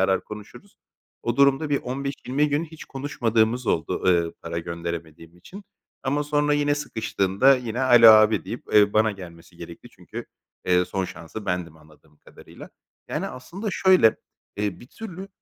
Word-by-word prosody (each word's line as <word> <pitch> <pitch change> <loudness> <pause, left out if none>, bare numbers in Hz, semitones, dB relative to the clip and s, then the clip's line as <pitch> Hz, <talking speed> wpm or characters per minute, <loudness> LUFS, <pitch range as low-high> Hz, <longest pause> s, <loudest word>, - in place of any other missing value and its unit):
arar, 95 0 +1
konuşuruz. 105 -1 -12 0.5
O 120 0 -2
durumda 140 +2 +3
bir 140 - +2
15-20 140 +2 -2
gün 145 +3 0
hiç 160 -1 -12
konuşmadığımız 120 -4 -1
oldu, 80 - -1
eee, 85 -2 +2
para 85 0 -4
gönderemediğim 85 -1 -7
için. 195 - -12 0.4
Ama 145 +2 -1
sonra 150 0 +1
yine 145 0 +1
sıkıştığında 115 -2 +1
yine, 120 0 -4
"alo, 120 -3 +7
abi" 110 0 +5
deyip, 120 - -7
eee, 105 -1 +5
bana 110 0 +3
gelmesi 85 -4 -12
gerekti - - -11
çünkü, - - -9 0.4
eee, 90 0 +3
son 95 0 -3
şansı 95 +5 -9
bendim 90 -3 -3
anladığım 75 0 -22
kadarıyla. - - -15 0.4
Yani, - - -3
aslında 190 - -7
şöyle, 185 - +4 0.4
eee, 105 -2 -3
bir 120 - -13
türlü, 195 - -9
110 Hz, 150 wpm, -24 LUFS, 90-140 Hz, 0.5 s, alo